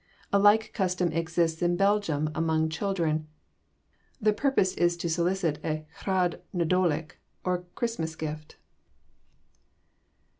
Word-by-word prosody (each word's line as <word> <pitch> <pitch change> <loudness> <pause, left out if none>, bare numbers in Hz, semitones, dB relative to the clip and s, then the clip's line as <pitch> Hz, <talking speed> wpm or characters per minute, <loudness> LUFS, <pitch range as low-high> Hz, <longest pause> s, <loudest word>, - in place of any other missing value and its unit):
A 200 - +5
like 205 +2 +4
custom 180 -4 0
exists 165 0 0
in 175 0 +2
Belgium, 195 -6 +1
among 160 0 +1
children. 160 -3 -1 0.9
The 215 -2 +3
purpose 210 -5 +2
is 175 0 +1
to 170 0 -3
solicit 170 -2 0
a 155 -1 -2 0.2
Rhodd 185 -3 +1
Nadolig, 170 -2 +1 0.3
or 180 -1 -1
Christmas 165 -10 -2
gift. 155 -1 -6
175 Hz, 110 wpm, -28 LUFS, 160-190 Hz, 0.9 s, A